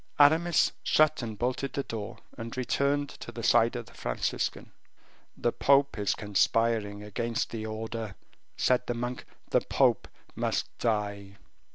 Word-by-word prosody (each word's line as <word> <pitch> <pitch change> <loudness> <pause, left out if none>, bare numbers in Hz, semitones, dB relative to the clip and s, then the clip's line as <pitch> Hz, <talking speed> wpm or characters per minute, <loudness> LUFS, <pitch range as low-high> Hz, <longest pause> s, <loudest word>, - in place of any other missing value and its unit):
Aramis 160 +3 +5
shut 155 -1 +3
and 110 -3 -5
bolted 125 +3 -1
the 140 - -1
door, 105 -6 -6 0.2
and 115 +2 -7
returned 140 +3 +1
to - - -9
the 115 0 -7
side 115 +3 +4
of 120 -1 -4
the - - -17
Franciscan. - - -2 0.7
"The 120 - +1
pope 140 +2 +3
is 100 -2 +1
conspiring 105 0 +1
against 115 +3 -2
the 110 -1 -4
order," 110 -1 -5 0.4
said 125 -1 +2
the 120 - -1
monk; 120 +1 -4 0.3
"the - - +4
pope - - +2 0.3
must - - -1
die." 100 -3 -1
115 Hz, 145 wpm, -29 LUFS, 105-130 Hz, 0.7 s, Aramis